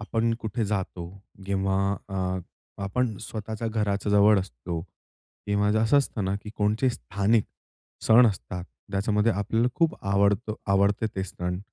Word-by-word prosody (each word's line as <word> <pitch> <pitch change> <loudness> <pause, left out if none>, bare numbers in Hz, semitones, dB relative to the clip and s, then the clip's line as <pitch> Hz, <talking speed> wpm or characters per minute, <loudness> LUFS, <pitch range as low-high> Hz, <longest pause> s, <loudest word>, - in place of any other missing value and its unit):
आपण 115 +2 0
कुठे 110 +1 -2
जातो 95 -4 -3 0.4
किंवा 95 0 0 0.3
अ, 95 -1 -1 0.4
आपण 110 +3 -1
स्वतःच्या 110 0 -4
घराच्या 105 -2 -1
जवळ 105 0 +6
असतो 80 +1 -5 0.7
किंवा 105 0 +2
असं 115 +6 +5
असतं 120 -7 -1
ना, 95 +1 0
की 105 +1 -9
कोणचे 105 +5 +2
स्थानिक 100 - +1 0.6
सण 120 +2 +8
असतात. 90 -4 -3 0.3
त्याच्यामध्ये 105 +3 +2
आपल्याला 110 +4 +1
खूप 165 -2 +2
आवडत 100 +3 +2 0.2
आवडते 100 +2 +2
ते 95 - -1
सण. 90 -1 -4
105 Hz, 135 wpm, -26 LUFS, 95-110 Hz, 0.7 s, सण